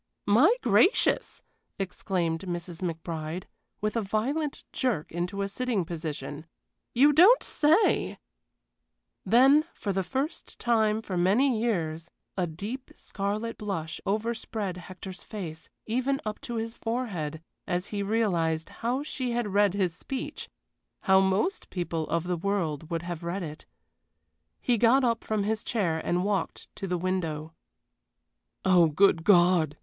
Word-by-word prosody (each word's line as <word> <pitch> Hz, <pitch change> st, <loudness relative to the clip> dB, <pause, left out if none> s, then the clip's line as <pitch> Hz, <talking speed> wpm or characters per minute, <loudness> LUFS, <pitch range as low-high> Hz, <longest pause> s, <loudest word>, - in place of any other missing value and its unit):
"My 240 Hz, -, +6 dB
gracious!" 385 Hz, -, +3 dB, 0.3 s
exclaimed 180 Hz, -3 st, -1 dB
Mrs. 175 Hz, -1 st, -5 dB
McBride, 165 Hz, 0 st, -4 dB, 0.4 s
with 215 Hz, +1 st, -1 dB
a 230 Hz, -, +2 dB
violent 260 Hz, +9 st, -1 dB
jerk 235 Hz, -, -1 dB
into 180 Hz, +4 st, -2 dB
a -, -, -1 dB
sitting 220 Hz, -3 st, -1 dB
position. 155 Hz, -2 st, -5 dB, 0.5 s
"You 285 Hz, +5 st, +6 dB
don't 380 Hz, -, +7 dB
say 315 Hz, +8 st, +2 dB, 0.6 s
" -, -, -54 dB
Then, 270 Hz, +5 st, +7 dB
for 200 Hz, -, -2 dB
the 190 Hz, 0 st, 0 dB
first 270 Hz, -, -4 dB
time 220 Hz, -2 st, +2 dB
for 185 Hz, -4 st, -3 dB
many 220 Hz, +7 st, +3 dB
years, 165 Hz, -7 st, -1 dB, 0.3 s
a 180 Hz, -2 st, 0 dB
deep 205 Hz, +11 st, -6 dB
scarlet 210 Hz, +3 st, -3 dB
blush 190 Hz, -7 st, -4 dB
overspread 215 Hz, -2 st, -2 dB
Hector's 185 Hz, +1 st, -9 dB
face, 165 Hz, -7 st, -7 dB, 0.2 s
even 260 Hz, +4 st, 0 dB
up 215 Hz, 0 st, -4 dB
to 240 Hz, -, -5 dB
his 225 Hz, 0 st, -3 dB
forehead 205 Hz, -12 st, -3 dB, 0.3 s
as 180 Hz, +1 st, -1 dB
he 205 Hz, -, -1 dB
realized 175 Hz, -7 st, 0 dB
how 250 Hz, +4 st, 0 dB
she 255 Hz, -5 st, -3 dB
had 235 Hz, -3 st, -1 dB
read 200 Hz, -1 st, +4 dB
his 185 Hz, -4 st, +1 dB
speech 265 Hz, +9 st, -5 dB, 0.5 s
how 190 Hz, 0 st, +5 dB
most 195 Hz, -, +1 dB
people 170 Hz, -3 st, -3 dB
of 170 Hz, -1 st, 0 dB
the 180 Hz, 0 st, -1 dB
world 165 Hz, -5 st, -2 dB
would 165 Hz, -1 st, -2 dB
have 175 Hz, -1 st, -5 dB
read 175 Hz, +3 st, -3 dB
it. 155 Hz, -1 st, -8 dB, 0.9 s
He 240 Hz, -3 st, +1 dB
got 240 Hz, +4 st, +5 dB
up 230 Hz, -2 st, +1 dB
from 215 Hz, -2 st, -1 dB
his 215 Hz, +1 st, -1 dB
chair 180 Hz, -9 st, 0 dB
and 175 Hz, +1 st, 0 dB
walked 200 Hz, -3 st, -2 dB
to 195 Hz, -, -4 dB
the 180 Hz, -1 st, 0 dB
window. 165 Hz, -4 st, -2 dB, 1.1 s
"Oh, 180 Hz, -3 st, +6 dB
good 165 Hz, +1 st, +3 dB
God!" 175 Hz, -5 st, +4 dB
195 Hz, 140 wpm, -28 LUFS, 170-230 Hz, 1.1 s, don't